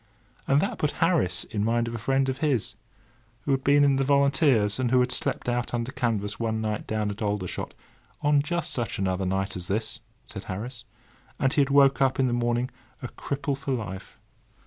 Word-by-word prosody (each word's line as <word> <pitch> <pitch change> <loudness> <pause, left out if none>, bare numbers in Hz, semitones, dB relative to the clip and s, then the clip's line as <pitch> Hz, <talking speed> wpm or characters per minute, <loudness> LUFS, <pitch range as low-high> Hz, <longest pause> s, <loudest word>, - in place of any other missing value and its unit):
And 140 - +4
that - - -2
put 150 - 0
Harris 165 - +1
in 105 -1 -3
mind 115 +1 +1
of 115 - -4
a 120 - -4
friend 135 +3 +1
of 130 0 -2
his, 125 -8 0 0.7
who 140 - -2
had 135 -1 +1
been 145 +1 +5
in 140 -1 +4
the 135 - +2
Volunteers, 135 -6 +3
and 125 -2 +1
who 130 +1 +4
had 125 0 +2
slept 125 - -2
out 120 0 -1
under 120 +2 -2
canvas 115 -6 -2
one 110 -1 -1
wet 110 -1 -1
night 105 - -5
down 105 -1 -1
at 100 - -8
Aldershot, 100 -4 -3 0.5
"on 145 -1 +4
just 170 +2 -2
such 120 -5 -2
another 95 -1 -1
night 95 +1 -1
as 90 -1 -6
this," 110 +2 -2 0.3
said - - -8
Harris; 115 +5 -6 0.5
and 135 -1 +1
he 150 - +4
had 140 - +1
woke 140 -1 +5
up 135 0 +2
in 135 - +4
the 125 - +1
morning 120 +1 0 0.3
a 125 - -4
cripple 140 0 -3
for 135 0 -3
life. 100 -6 -6
120 Hz, 210 wpm, -26 LUFS, 105-135 Hz, 0.7 s, been